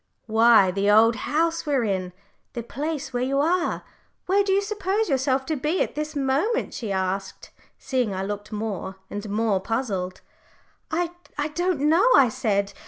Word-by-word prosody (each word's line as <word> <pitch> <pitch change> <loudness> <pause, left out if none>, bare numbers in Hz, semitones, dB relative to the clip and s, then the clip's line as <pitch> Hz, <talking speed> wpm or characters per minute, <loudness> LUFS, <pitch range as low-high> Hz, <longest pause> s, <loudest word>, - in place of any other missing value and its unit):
"Why, 220 -3 +5
the 200 +2 0
old 225 +2 +6
house 330 +7 0
we're 275 -4 +2
in 190 -4 -2 0.4
the 235 - -4
place 280 +2 -4
where 245 - -1
you 270 +2 0
are. 340 +5 +1 0.4
Where 400 +2 +3
do 395 - -1
you 395 +1 +3
suppose 415 +1 -1
yourself 265 -1 +1
to 315 - -1
be 300 +6 0
at - - -6
this 305 +1 -4
moment?" 285 - 0
she 220 -4 -4
asked, 190 0 -3 0.3
seeing 255 -5 -1
I 190 0 -3
looked 205 +1 -5
more 205 -3 -4 0.2
and 205 +1 -5
more 210 -1 +1
puzzled. 195 -4 -3 0.7
"I 345 +1 0 0.4
don't 350 -2 0
know," 330 +10 +4
I 265 -4 +6
said. 200 -3 -1
255 Hz, 165 wpm, -24 LUFS, 205-315 Hz, 0.7 s, old